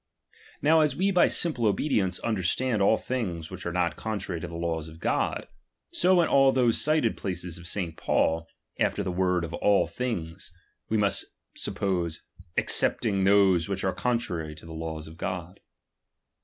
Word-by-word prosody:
Now 160 +2 +5
as 150 -1 +1
we 195 +2 +1
by 180 -2 +5
simple 120 -11 +2
obedieoce 95 -6 0
understand 110 +2 0
all 105 +3 +4
things 90 -11 -4
which 95 -2 -6
are - - -2
not 85 -1 0
contrary 100 -6 -4
to 90 - -5
the 85 - -8
laws 85 -2 -2
of 80 0 -12
God; - - -1 0.4
so 185 0 +3
in 135 -4 +4
those 120 -3 +3
cited 155 -7 +2
places 90 -2 -4
of 85 - -9
St. 90 -3 -2
Paul, 80 0 0 0.3
after - - +1
the 90 - -2
word 90 -1 +1
all 100 +2 +3
things, 90 -10 -5 0.4
we 110 - +1
must 100 -1 +1 0.3
suppose, 85 -5 -2 0.3
excepting 100 -5 +3
those 95 -3 +4
which 95 -1 -2
are 95 - 0
contrary 90 -7 -2
to 80 - -13
the 80 - -9
laws 80 -1 -5
of 80 +1 -12
God. 90 +1 -5
95 Hz, 160 wpm, -27 LUFS, 85-115 Hz, 0.4 s, Now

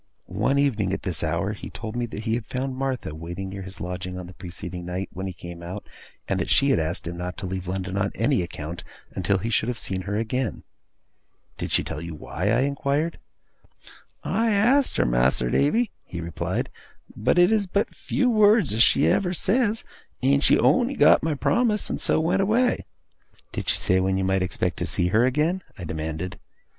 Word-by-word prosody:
One 140 - 0
evening, 110 -9 +1
at - - -3
this 85 -4 -2
hour, 85 +5 0
he 100 - -8
told 110 -1 -7
me 120 -1 -1
that 110 -1 -7
he 110 -1 0
had 115 -1 -2
found 135 0 -3
Martha 130 - -2
waiting 85 +4 -6
near 95 0 -6
his 95 0 -9
lodging 90 +1 -5
on 90 - -6
the 90 - -11
preceding 90 0 -7
night 90 +2 -4
when 95 +1 -4
he - - -3
came 85 -1 -9
out, 90 +4 -7 0.4
and - - 0
that - - -2
she 140 0 +4
had - - +3
asked 80 +3 -2
him 85 +1 -5
not 90 +1 -5
to 100 - -4
leave 95 0 -4
London 95 +1 -3
on 100 -1 0
any 120 +2 +2
account, 85 0 -6 0.3
until 95 +1 +1
he 115 +5 -3
should 110 - +1
have 125 - -2
seen 95 -3 -2
her 105 - -1
again. 115 +2 -2 1.0
'Did - - -3
she - - +3
tell 75 - -5
you 85 -1 -6
why?' 90 +5 -3
I 115 +3 +3
inquired. 140 +3 0 1.0
'I 230 +1 +1
asked 240 +7 +3
her, - - +3
Mas'r - - +2
Davy,' 220 +11 +2
he 85 - -7
replied, 85 -1 -3 0.4
'but 110 +10 +1
it 175 +3 +6
is 210 -3 +2
but 200 +3 0
few 255 - 0
words 215 - +5
as 110 - +2
she 135 - +5
ever 180 -2 +2
says, 220 +4 +1 0.4
and 140 +2 +3
she - - +6
on'y 255 +2 +3
got - - +6
my 160 -1 0
promise 215 - +1
and - - -2
so - - +2
went 165 +4 +2
away.' 230 +6 +2 0.7
'Did - - -3
she - - +4
say 95 - +2
when 95 0 +1
you 95 - 0
might 95 0 +1
expect 90 -2 -1
to - - -2
see 90 - +1
her 115 +6 +4
again?' 155 +8 +1 0.2
I 90 - -7
demanded. 80 +2 -4
105 Hz, 205 wpm, -25 LUFS, 90-145 Hz, 1.0 s, it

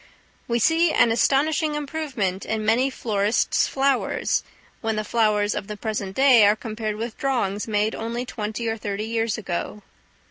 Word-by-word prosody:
We 235 - +1
see 325 +7 +3
an 235 - +4
astonishing 295 +6 +2
improvement 275 -11 -3
in 220 -1 -2
many 240 +5 +3
florists' 215 -3 +1
flowers, 270 -1 0 0.4
when 225 -1 -1
the 215 - -1
flowers 210 -2 +1
of 200 - -5
the 210 - -6
present 205 -3 -4
day 265 -5 +6
are 205 - +4
compared 215 -1 -4
with 225 +2 -6
drawings 220 -7 -1
made 210 0 0
only 235 +2 -4
twenty 220 0 -4
or 225 0 -1
thirty 205 0 -4
years 225 -1 -1
ago. 205 +1 -4
225 Hz, 155 wpm, -23 LUFS, 210-255 Hz, 0.4 s, day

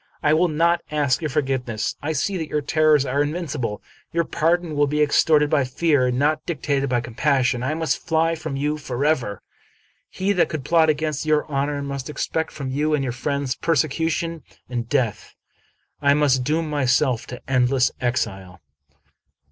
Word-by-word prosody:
I 150 - +4
will 170 +3 +3
not 170 +2 +2
ask 145 -2 +1
your 155 - -2
forgiveness. 130 -6 -1
I 155 +2 -2
see 195 +5 -1
that 160 -3 -4
your 150 -1 -1
terrors 155 -1 +3
are 140 +2 0
invincible. 145 - -3 0.3
Your 170 0 +1
pardon 165 0 0
will 145 0 +3
be 150 +2 -1
ex 145 - +3
torted 150 -2 +4
by 150 -3 +3
fear, 130 0 +1
and 125 0 -1
not 150 +3 +1
dictated 140 -4 -1
by 120 -1 +1
compassion. 125 +1 0
I 135 +5 -1
must 160 +1 -2
fly 165 0 +2
from 160 -3 -5
you 150 +2 -1
forever. 130 -6 -1 0.7
He 195 +2 -1
that 180 - +2
could 150 -4 -5
plot 160 0 +4
against 155 0 -1
your 155 -1 +2
honor 140 0 -2
must 140 0 -5
expect 160 +2 -2
from 135 -3 -5
you 150 +3 +1
and 140 - -1
your 125 -3 -2
friends 140 +1 -2
persecution 165 +2 -1 0.3
and 120 -2 -4
death. 125 -7 -1 0.7
I 140 0 +4
must 140 -4 +2
doom 155 +4 0
myself 130 -4 +1
to 125 - -8
endless 125 0 +2
exile." 95 -7 -2
145 Hz, 170 wpm, -22 LUFS, 130-155 Hz, 0.7 s, I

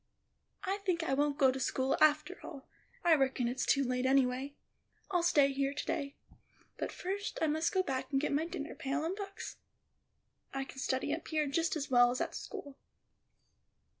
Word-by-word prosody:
"I 390 +1 -1
think 365 -4 0
I 270 - 0
won't 285 +1 +1
go 265 -2 +5
to 265 - -4
school 265 0 +1
after 310 +4 +3
all. 280 -5 -9 0.4
I 340 - +7
reckon 265 -4 +2
it's 250 +2 -2
too 275 - +4
late, 255 0 0
anyway; 265 +1 +2 0.6
I'll 355 -2 +3
stay 290 -5 +4
here 275 +1 0
to 295 - -3
day. 280 0 -2 0.6
But - - -2
first, 400 +3 -4
I - - +2
must 315 +2 +1
go 375 -1 +2
back 265 -4 -2
and 270 - +3
get 290 - -1
my 310 +3 +1
dinner 305 -2 -5
pail 300 +2 -2
and 350 +4 -1
books. 395 -1 -7 1.0
I 270 - -1
can 270 - -10
study 265 +2 0
up 325 - -5
here 310 -1 +1
just 325 +5 0
as 295 -2 -4
well 245 -1 +7
as 250 +2 -2
at - - -2
school." 290 -10 -7
285 Hz, 190 wpm, -33 LUFS, 270-330 Hz, 1.0 s, I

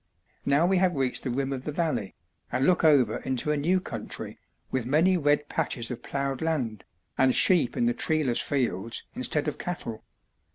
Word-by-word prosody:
Now 145 +4 +4
we 190 +1 +3
have 180 -2 +2
reached 135 -2 0
the 130 - -3
rim 135 +2 -1
of 130 -1 -5
the 150 - -3
valley, 155 - -2 0.4
and 130 +2 +1
look 180 +1 +3
over 140 -8 +4
into 130 +3 -1
a - - +2
new 170 +6 +2
country, - - -7 0.3
with 130 -3 -1
many 165 +7 +4
red 145 -3 +2
patches 120 -2 -2
of 120 -1 -6
ploughed 140 -1 -3
land, 130 -11 -1 0.4
and 130 -1 +4
sheep 170 -10 +4
in 240 - +1
the 240 0 +2
treeless 155 - +1
fields 115 -6 -2
instead 145 +4 -1
of 150 - -3
cattle. 115 -11 -5
140 Hz, 180 wpm, -27 LUFS, 125-160 Hz, 0.4 s, Now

